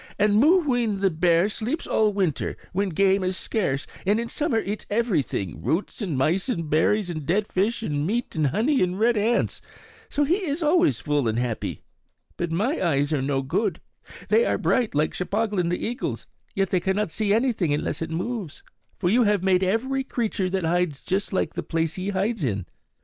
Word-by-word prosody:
And 210 0 +3
Mooween 250 - +3
the 195 -1 +2
bear 170 +2 +3
sleeps 235 +9 -3
all 215 -1 +2
winter, 190 -7 -1 0.2
when 195 +2 0
game 195 +3 +2
is 185 0 -1
scarce, 140 -11 -1 0.2
and 205 +4 +2
in 235 0 -3
summer 295 -6 0
eats 210 -1 -3
everything, 170 - -1
roots 170 - -2
and 175 -9 -2
mice 170 - +1
and 165 -10 -2
berries 175 +5 +2
and 155 -3 -5
dead 195 +8 +1
fish 210 +5 -1
and 145 -4 -1
meat 235 +5 -2
and 155 -2 +2
honey 250 - +1
and 180 +1 0
red 235 +2 +3
ants. 220 +3 +1 0.5
So 290 - +1
he 330 +6 +2
is 315 0 -2
always 340 +3 +3
full 145 -4 0
and 110 0 0
happy. 120 -2 -3 0.5
But 175 -1 -3
my 215 - 0
eyes 145 -3 +1
are 145 - +1
no 135 0 0
good; 140 +11 -1 0.5
they 460 - +4
are - - +1
bright, 245 - +1
like 150 +1 +1
Cheplahgan 200 -2 -1
the 175 - -2
eagle's, 245 +4 -3 0.3
yet 195 -2 0
they 185 - +3
cannot 190 +1 -1
see 210 +1 -1
anything 220 - +2
unless 145 - -1
it 165 - -3
moves; 180 -2 -4 0.3
for - - -1
you 230 +7 +4
have 205 -3 +2
made 190 -1 +3
every 250 +8 0
creature 220 -7 -1
that 185 -2 -1
hides 170 -4 0
just 195 +2 -2
like 190 - -1
the - - -3
place 165 -1 -1
he 185 +2 -3
hides 200 0 -1
in. 100 -8 -1
195 Hz, 195 wpm, -24 LUFS, 165-225 Hz, 0.5 s, they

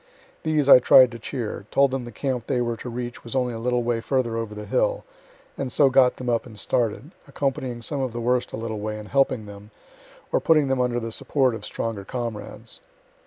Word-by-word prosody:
These 155 -3 +1
I 140 - +10
tried 125 0 +7
to 115 - -8
cheer, 110 -4 -5
told 140 -1 +3
them 130 -2 -3
the 120 - -8
camp 125 0 -3
they 125 - 0
were 120 -1 -1
to 125 - -7
reach 120 0 -6
was 115 - -6
only 125 -2 0
a 115 - -5
little 125 +1 0
way 115 -1 0
further 125 -3 0
over 115 -2 -4
the 105 0 -7
hill, - - 0 0.6
and 135 -2 -3
so 135 +2 +4
got 130 -1 +5
them 125 - -6
up 120 0 0
and 110 -3 -13
started, 115 - -1 0.2
accompanying 130 -3 -3
some 140 +3 -3
of 130 -2 -2
the 120 - -5
worst 125 +1 0
a - - -5
little 110 -1 -4
way, 105 +1 -4
and 105 0 -9
helping 130 -5 +1
them, 100 0 -11 0.6
or - - +3
putting 155 -4 +3
them 135 -1 +1
under 120 -1 0
the 115 -1 -5
support 130 +2 +1
of 115 - -7
stronger 110 -3 -4
comrades. 115 -1 -6
120 Hz, 220 wpm, -24 LUFS, 115-130 Hz, 0.6 s, I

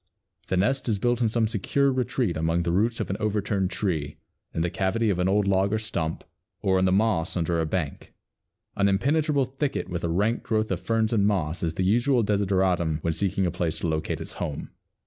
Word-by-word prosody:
The 95 - 0
nest 130 +7 +1
is 105 - +1
built 120 +3 0
in 115 - +3
some 115 0 +1
secure 135 +6 +1
retreat 125 -7 0
among 80 +2 0
the 85 - 0
roots 110 +6 +1
of - - -2
an 95 - -2
overturned 105 -2 0
tree, 80 -9 -2 0.3
in 80 - -2
the 85 0 0
cavity 105 +3 +1
of 90 - -1
an 90 - +2
old 100 0 +2
log 95 0 +2
or 110 - +2
stump, 85 -7 -3 0.4
or 95 -1 +2
in 95 - +2
the 95 - +3
moss 95 -4 +1
under 85 -1 0
a 80 - -1
bank. 80 -4 -3 0.6
An 100 - +2
impenetrable 140 +7 +2
thicket 135 +2 -3
with 90 0 -4
a 85 - 0
rank 105 +7 +1
growth 110 -3 -1
of - - 0
ferns 115 0 0
and 100 -3 +3
moss, 90 -5 -1
is 85 -1 -2
the 95 - 0
usual 120 +5 +3
desideratum 95 -5 +1
when 85 - +1
seeking 95 +2 0
a 90 - 0
place 85 -2 -2
to - - -2
locate 80 0 -2
its - - -7
home. 70 - -4
100 Hz, 215 wpm, -26 LUFS, 85-110 Hz, 0.6 s, in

